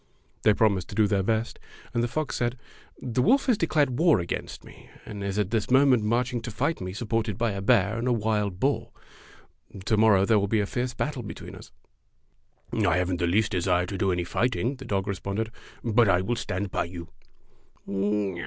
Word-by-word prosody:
They 105 - +4
promised 100 -5 +2
to - - -8
do 110 - +4
their 100 -1 +1
best, 110 +3 -1 0.3
and 120 - +1
the 120 - +1
fox 155 +3 -3
said: 120 +1 -1 0.5
"The 125 0 0
wolf 265 - +3
has 250 - +3
declared 150 -8 +1
war 165 - +5
against 85 -1 -5
me, - - -15 0.2
and 105 -2 -7
is 100 0 -3
at 105 -1 0
this 110 -3 0
moment 130 -2 +5
marching 120 +2 0
to 115 - -6
fight 140 +7 -1
me 90 0 -4
supported 110 0 -2
by 115 -1 0
a 100 0 -4
bear 110 0 +2
and 120 - -2
a - - +2
wild 105 -4 0
boar. 140 +4 0 1.0
To 110 - +2
morrow 105 -3 +5
there 110 0 +4
will 100 - 0
be 110 +2 +1
a 100 - +1
fierce 125 +4 -3
battle 145 -4 -2
be 110 - -7
tween - - -10
us." - - -12 0.6
" - - -32
I 80 - +3
have 90 0 0
n't 90 - -2
the 85 - +1
least 105 +5 +2
desire 90 -1 +1
to 100 +2 -5
do 95 -3 +2
any 90 -1 0
fight 120 +7 0
ing," 130 +4 -2
the 130 - -10
dog 100 -4 -1
responded, 100 +3 -3 0.3
"but 115 -1 +3
I 90 -1 +3
will 120 +6 -1
stand 95 -3 -3
by - - -1
you." 85 -1 -8
110 Hz, 215 wpm, -26 LUFS, 100-120 Hz, 1.0 s, war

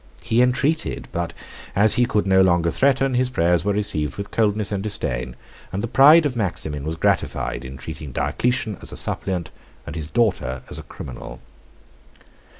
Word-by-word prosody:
83 - - -3
He - - +6
entreated; 135 +6 0
but 85 0 -2 0.4
as 105 +2 +5
he 120 0 +3
could 105 -3 +1
no 95 -1 +4
longer 85 -2 +3
threaten, 135 +2 +2
his 125 0 +1
prayers 85 -6 +2
were 105 - +1
received 100 -8 0
with 100 0 -6
coldness 105 -2 +1
and 100 -2 -1
disdain; 65 - -1 0.4
and 95 +3 -3
the - - -1
pride 145 +8 +7
of 135 -4 -1
Maximin 80 -9 -2
was 80 +1 -2
gratified, 80 - -1
in 65 +1 -8
treating 75 +1 -8
Diocletian 120 - -1
as - - -6
a - - -6
suppliant, 90 -3 -2 0.3
and 75 - -7
his 80 -3 -4
daughter 80 - 0
as - - -6
a - - -12
criminal. - - -8
100 Hz, 175 wpm, -22 LUFS, 80-120 Hz, 0.4 s, pride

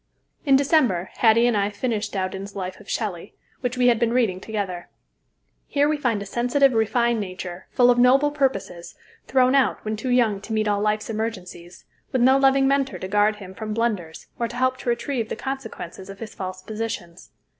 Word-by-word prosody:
In 275 - +6
December 265 - +2
Hattie 230 0 +5
and 240 -2 +2
I 200 0 +1
finished 210 0 -2
Dowden's 195 +1 -4
"Life 185 -1 -5
of 210 - -15
Shelley," 195 -7 -4 0.2
which 250 0 -3
we 250 - +2
had 240 -2 +4
been 235 -1 +1
reading 225 -7 +1
together. 195 -5 -4 0.8
Here 285 0 +2
we 305 - +1
find 240 -8 -1
a - - -10
sensitive, 245 +6 +2
refined 235 +1 +1
nature, 185 -2 -6
full 245 -1 +4
of 245 - +2
noble 270 +4 +5
purposes, 195 -12 -2 0.3
thrown 255 -1 +3
out 275 -5 +2
when 215 0 -1
too 235 +4 -4
young 230 -5 +2
to 220 - -6
meet 215 0 +1
all 205 -1 +1
life's 215 +1 0
emergencies, 185 -6 -6 0.3
with 255 -2 +2
no 265 +2 +5
loving 270 0 +4
Mentor 275 0 +1
to 185 - -6
guard 210 +2 +2
him 190 -3 -10
from 215 +1 -5
blunders 205 -9 -2
or 235 - 0
to 240 - -9
help 255 +1 +1
to 245 - -4
retrieve 235 -1 -2
the - - -3
consequences 225 -8 -6
of 195 - -9
his 215 0 -8
false 185 -1 -6
positions. 210 -5 -6
220 Hz, 195 wpm, -23 LUFS, 195-250 Hz, 0.8 s, In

